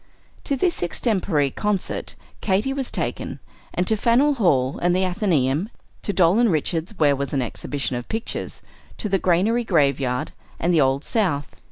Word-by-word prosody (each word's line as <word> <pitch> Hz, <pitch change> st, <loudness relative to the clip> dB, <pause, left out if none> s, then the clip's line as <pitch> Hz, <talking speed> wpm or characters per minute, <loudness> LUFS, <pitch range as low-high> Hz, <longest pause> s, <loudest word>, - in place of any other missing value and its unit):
To 280 Hz, -, 0 dB
this 345 Hz, +6 st, 0 dB
extempore 175 Hz, -, +1 dB
concert 210 Hz, +3 st, -2 dB, 0.3 s
Katy 210 Hz, +7 st, +1 dB
was 270 Hz, -2 st, -3 dB
taken, -, -, -3 dB, 0.3 s
and 180 Hz, -, 0 dB
to 220 Hz, -, +3 dB
Faneuil 240 Hz, +7 st, +3 dB
Hall 140 Hz, -, +1 dB
and 175 Hz, 0 st, +2 dB
the 185 Hz, +1 st, +2 dB
Athenaeum, 175 Hz, -, +1 dB, 0.3 s
to -, -, -1 dB
Doll 185 Hz, +2 st, +4 dB
and 235 Hz, -4 st, +4 dB
Richards's, 165 Hz, +5 st, -1 dB
where 145 Hz, -3 st, +4 dB
was 140 Hz, 0 st, -4 dB
an 135 Hz, -, +1 dB
exhibition 135 Hz, +2 st, -3 dB
of 120 Hz, 0 st, -6 dB
pictures, 225 Hz, +1 st, -4 dB, 0.3 s
to -, -, 0 dB
the 195 Hz, -1 st, +1 dB
Granary 195 Hz, +8 st, +2 dB
Graveyard, 140 Hz, -, +1 dB, 0.3 s
and 175 Hz, +2 st, +1 dB
the 160 Hz, -, +4 dB
Old 135 Hz, +1 st, +2 dB
South. 165 Hz, -, -1 dB
180 Hz, 165 wpm, -23 LUFS, 140-215 Hz, 0.3 s, Doll